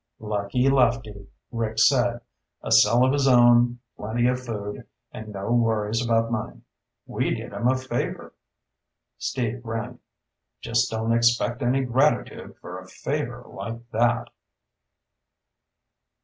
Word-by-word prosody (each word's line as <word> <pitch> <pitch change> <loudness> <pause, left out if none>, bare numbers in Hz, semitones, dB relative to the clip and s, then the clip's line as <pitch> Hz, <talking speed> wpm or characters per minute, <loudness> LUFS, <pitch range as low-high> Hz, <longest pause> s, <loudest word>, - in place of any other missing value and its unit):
"Lucky 105 +4 -1
Lefty," 115 -6 +1 0.2
Rick 115 -2 -3
said. 120 -3 +3 0.4
"A - - -5
cell 120 +4 +6
of 130 - +2
his 140 -1 +2
own, 120 -1 +5 0.2
plenty 115 +3 -1
of 125 0 -1
food, 105 -4 -6 0.2
and 110 - -9
no 100 +1 -5
worries 115 -1 +1
about 115 -1 +1
money. 110 -2 -4 0.4
We - - -2
did - - -8
him 120 - -1
a 130 +1 +3
favor." 130 0 -4 0.9
Steve 120 -1 -2
grinned. 115 -2 -5 0.6
"Just 120 +2 0
don't 110 +1 -1
expect 120 +1 +2
any 130 +2 +1
gratitude 130 +5 0
for - - -8
a - - -13
favor - - -4
like 115 +1 -8
that!" 120 +1 +1
120 Hz, 125 wpm, -24 LUFS, 110-125 Hz, 0.9 s, cell